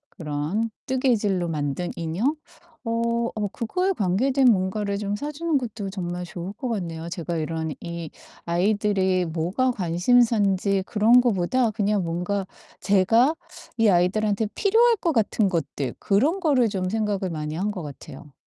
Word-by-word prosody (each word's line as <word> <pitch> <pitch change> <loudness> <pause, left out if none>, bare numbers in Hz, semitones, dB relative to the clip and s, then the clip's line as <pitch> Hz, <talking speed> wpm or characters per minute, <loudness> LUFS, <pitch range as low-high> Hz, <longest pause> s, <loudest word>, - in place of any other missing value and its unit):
그런 155 +8 -2 0.2
뜨개질로 225 -9 +1
만든 150 +2 -2
인형. 175 - -1 0.5
어 235 0 0
어 210 -1 -1
그거에 365 - -1
관계된 255 - +1
뭔가를 200 +1 -1
좀 205 0 -2
사주는 300 +5 -1
것도 220 -5 -5
정말 180 -2 -4
좋을 175 +2 -6
것 245 +3 -5
같네요. 170 -6 -4
제가 170 -1 -4
이런 160 0 -3
이 170 -2 -6 0.4
아이들이 190 0 +1
뭐가 175 +11 0
관심사인지 200 0 +2
그런 230 +3 +5
거보다 235 +1 +1
그냥 205 -2 0
뭔가 180 +4 -2 0.4
제가 225 - +3 0.4
이 225 -1 +4
아이들한테 200 +4 +2
필요할 460 +3 +4
것 340 - 0
같은 220 -3 +2
것들 145 -7 -2
그런 275 - +2
거를 270 - +3
좀 185 -3 -2
생각을 205 -3 -1
많이 155 -2 -4
한 200 +5 -1
것 185 -5 -6
같아요. 145 0 -10
200 Hz, 295 characters per minute, -24 LUFS, 175-230 Hz, 0.5 s, 그런